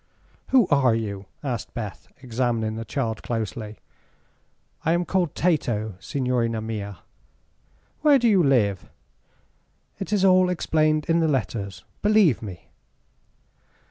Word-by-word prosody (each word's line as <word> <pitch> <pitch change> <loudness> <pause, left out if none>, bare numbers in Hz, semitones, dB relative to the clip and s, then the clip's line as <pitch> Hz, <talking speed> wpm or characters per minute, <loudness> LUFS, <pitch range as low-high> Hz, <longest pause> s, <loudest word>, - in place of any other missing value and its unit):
"Who 250 -7 +4
are 130 -6 +4
you?" 100 -3 -4 0.2
asked 125 -6 -4
Beth, 105 -5 -6 0.2
examining 115 -3 -1
the 115 - -4
child 115 -3 -3
closely. 110 -2 -4 1.1
"I 165 - +2
am 175 +1 +1
called 180 -5 0
Tato, 120 - 0
signorina 125 -4 -1
mia." 105 -3 -5 1.0
"Where 295 -2 +6
do 240 -2 +2
you 200 -5 +5
live?" 110 - +2 1.1
"It 195 - -5
is 200 -2 +3
all 185 -1 +5
explained 155 -3 +1
in 165 0 +3
the 165 - +2
letters, 115 -8 -2 0.2
believe 205 - +4
me." 95 -6 -9
125 Hz, 120 wpm, -24 LUFS, 110-170 Hz, 1.1 s, Where